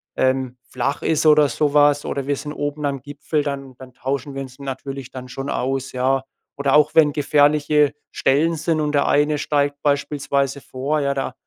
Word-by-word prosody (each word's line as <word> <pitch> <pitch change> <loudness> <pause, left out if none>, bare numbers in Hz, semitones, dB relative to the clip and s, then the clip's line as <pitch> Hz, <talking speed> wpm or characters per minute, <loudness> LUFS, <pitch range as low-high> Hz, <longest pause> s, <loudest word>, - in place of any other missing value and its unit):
ähm, 130 -1 0
flach 130 +2 -2
ist 160 -1 +1
oder 150 -2 +6
so 150 -2 0
was 145 -1 +4
oder 140 -1 -3
wir 145 - +1
sind 150 +2 -6
oben 145 0 -3
am 140 -2 -2
Gipfel, 145 +2 -3
dann 135 -2 -5
dann 130 0 -12
tauschen 135 +1 -4
wir 135 - -3
uns 130 +1 -13
natürlich 135 -1 -6
dann 130 -1 -8
schon 135 +3 -5
aus, 135 +1 -2
ja? 130 +1 +1 0.4
Oder 140 0 +2
auch 150 0 +4
wenn 150 -2 +5
gefährliche 150 0 +3 0.2
Stellen 150 +5 +2
sind, 160 0 0
und 150 - 0
der 140 - +2
eine 150 +1 +2
steigt 145 -1 0
beispielsweise 140 -1 0
vor, 140 +5 -2
ja, 140 -1 0
da 135 -1 -3
140 Hz, 190 wpm, -21 LUFS, 135-150 Hz, 0.4 s, oder